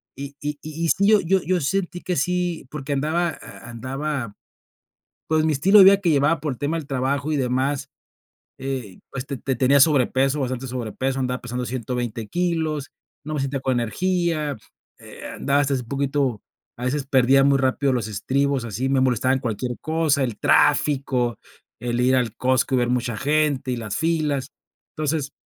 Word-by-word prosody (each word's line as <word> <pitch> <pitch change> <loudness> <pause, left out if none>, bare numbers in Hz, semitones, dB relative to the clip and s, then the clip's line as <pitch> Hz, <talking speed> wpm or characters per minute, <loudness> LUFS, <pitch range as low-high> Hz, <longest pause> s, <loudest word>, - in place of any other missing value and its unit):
y 140 +1 -7
y 150 0 -4
y 160 +2 -3
sí, 200 +4 +3
yo 215 0 +6
yo 185 +2 +2
yo 180 -2 0
sentí 180 +3 -2
que 180 - -2
sí 175 -1 -1
porque 145 -1 -5
andaba 160 +5 0
a - - -11
andaba, 130 -1 -4 0.9
pues, 155 0 +2
mi 160 - +2
estilo 190 +9 +5
de - - +10
vida 195 0 +7
que 175 -4 +1
llevaba 145 +2 +2
por 150 -2 -2
el 125 - -8
tema 150 +3 -1
del 150 - -7
trabajo 140 +2 -1
y 150 - +1
demás. 135 +2 -1 0.7
Eh, 130 -8 -5
este, 135 +1 -4
te 135 -1 -2
tenía 135 +2 +4
sobrepeso, 135 -1 +3
bastante 130 0 -3
sobrepeso, 130 +2 -3
andaba 125 -1 -2
pesando 125 +1 -4
120 120 -2 -4
kilos, 160 -5 -1 0.3
no 155 - -4
me 150 - -1
sentía 135 +1 -2
con 130 -1 0
energía, 165 +2 -1 0.4
eh, - - -11
andaba 140 +1 +1
hasta 140 -1 +1
así 130 - -2
poquito, 135 -2 -1 0.4
a 120 - -6
veces 135 +2 -1
perdía 135 0 +4
muy 140 0 +4
rápido 135 +1 +1
los 120 -4 -1
estribos, 135 +5 0
así 115 +4 -2
me 135 -1 +2
molestaba 130 0 +2
en 135 - -2
cualquier 125 0 -3
cosa, 155 -3 +1
el 120 -5 -2
tráfico, 135 -5 +2 0.4
el 120 0 -1
ir 130 +1 +3
al 120 -4 -1
Costco 130 +1 +1
y - - +3
ver 120 0 +1
mucha 125 -2 -1
gente, 145 -1 +1
y - - -1
las 110 -3 -4
filas. 150 -3 -1 0.4
Entonces 150 -2 -1
135 Hz, 180 wpm, -23 LUFS, 125-150 Hz, 0.9 s, de